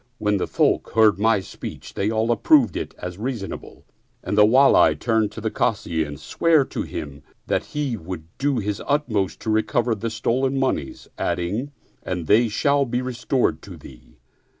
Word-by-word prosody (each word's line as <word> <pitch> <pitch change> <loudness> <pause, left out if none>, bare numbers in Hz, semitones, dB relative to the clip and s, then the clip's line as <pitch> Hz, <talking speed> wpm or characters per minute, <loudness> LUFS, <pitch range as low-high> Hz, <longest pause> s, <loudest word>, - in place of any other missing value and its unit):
When 105 -4 +1
the 90 - -2
folk - - +1
heard 110 -4 +5
my 110 -1 +3
speech - - -9
they 100 - -1
all 110 +1 +1
approved 120 - +4
it - - -5
as 90 +1 -7
reasonable 115 -4 -6 0.4
and - - -2
the 105 - +6
Wali 135 +5 +5
turned 110 -3 0
to 110 - -7
the 110 0 -2
Kazi 85 -8 0
and 75 -2 -8
sware 160 -4 +2
to - - -5
him 70 -1 -7 0.2
that - - -1
he 145 -5 -3
would 85 -2 -7 0.2
do 140 -1 +1
his 105 -2 -2
utmost 115 - 0
to 110 - -2
recover 115 +2 +1
the 110 +2 -3
stolen 130 +5 0
moneys 135 -1 -2
adding, 105 +11 -2 0.2
" - - -38
And 90 -3 -4
they 110 +7 +4
shall 140 +6 +2
be 125 0 -2
restored 125 +1 -1
to - - -11
thee." - - -15
110 Hz, 175 wpm, -22 LUFS, 100-130 Hz, 0.4 s, the